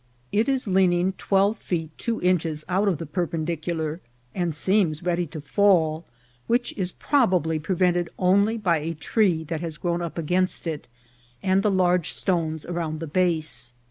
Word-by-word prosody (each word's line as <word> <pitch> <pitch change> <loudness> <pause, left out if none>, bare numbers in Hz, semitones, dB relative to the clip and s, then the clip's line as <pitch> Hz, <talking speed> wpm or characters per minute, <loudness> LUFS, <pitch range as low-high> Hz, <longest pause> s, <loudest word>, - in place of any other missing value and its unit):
It 220 +6 +2
is 265 -2 +1
leaning 185 -1 +3
twelve 200 +2 +2
feet 160 -3 -3
two 230 -1 -2
inch 180 -2 +3
es 155 -2 -4
out 190 +3 +1
of 185 -5 +2
the 165 - -6
perpendicular, 165 -1 -2 0.3
and 175 -4 -1
seems 175 -2 +1
ready 175 -1 0
to 155 +1 -8
fall, 160 -1 +2 0.4
which 240 +1 +1
is 185 -2 -2
probably 180 - +1
prevented 175 +1 +1
only 200 +5 +3
by 180 -7 +2
a 160 +2 -4
tree 165 - +1
that 160 0 -4
has 165 -3 -5
grown 175 +1 -1
up 170 -1 -5
against 180 +4 0
it 160 -3 -4 0.6
and 190 +1 +3
the 210 - +2
large 180 -3 +2
stones 160 -4 -1
around 165 -3 -3
the 165 - -4
base. 160 -6 -1
175 Hz, 165 wpm, -24 LUFS, 160-190 Hz, 0.6 s, leaning